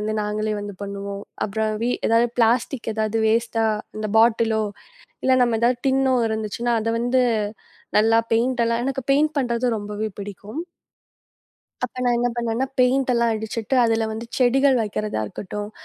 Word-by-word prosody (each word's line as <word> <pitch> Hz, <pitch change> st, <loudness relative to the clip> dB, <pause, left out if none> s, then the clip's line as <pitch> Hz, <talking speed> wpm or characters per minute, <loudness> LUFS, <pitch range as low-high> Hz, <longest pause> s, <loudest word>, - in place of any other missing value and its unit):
வந்து 215 Hz, +1 st, -2 dB
நாங்களே 215 Hz, +1 st, -1 dB
வந்து 205 Hz, -1 st, -6 dB
பண்ணுவோம். 200 Hz, 0 st, -5 dB, 0.2 s
அப்புறம் 215 Hz, +1 st, -1 dB
வி 240 Hz, -, +1 dB, 0.2 s
ஏதாவது 230 Hz, +1 st, +4 dB
பிளாஸ்டிக் 230 Hz, +1 st, +1 dB
ஏதாவது 220 Hz, 0 st, 0 dB
வேஸ்டா 225 Hz, 0 st, +1 dB, 0.3 s
அந்த 215 Hz, 0 st, -3 dB
பாட்டிலோ! 225 Hz, -1 st, +3 dB, 0.6 s
இலல 260 Hz, 0 st, +4 dB
நம்ம 235 Hz, -2 st, +2 dB
ஏதாவது 245 Hz, +1 st, +3 dB
டின்னோ 265 Hz, 0 st, +3 dB
இருந்துச்சுன்னா 220 Hz, +2 st, -2 dB
அத 225 Hz, -, -2 dB
வந்து 245 Hz, +2 st, +2 dB, 0.8 s
நல்லா 225 Hz, +1 st, +4 dB
பெயிண்டெல்லாம் 235 Hz, 0 st, +1 dB
எனக்கு 270 Hz, 0 st, -2 dB
பெயிண்ட் 300 Hz, +2 st, +2 dB
பண்றது 245 Hz, -2 st, 0 dB
ரொம்பவே 210 Hz, +1 st, -4 dB
பிடிக்கும். 205 Hz, -, -6 dB, 1.2 s
அப்போ 250 Hz, +1 st, -6 dB
நான் 245 Hz, -1 st, +3 dB
என்ன 245 Hz, -, +1 dB
பண்ணேன்னா, 235 Hz, +2 st, -1 dB
பெய்ண்ட்டெல்லாம் 250 Hz, -2 st, +3 dB
அடிச்சிட்டு 220 Hz, +3 st, -2 dB
அதுல 225 Hz, -1 st, +1 dB
வந்து 225 Hz, +2 st, -6 dB
செடிகள் 265 Hz, +2 st, +4 dB
வைக்கிறதா 210 Hz, -, -3 dB
இருக்கட்டும். 205 Hz, -, -6 dB
230 Hz, 140 wpm, -22 LUFS, 215-245 Hz, 1.2 s, ஏதாவது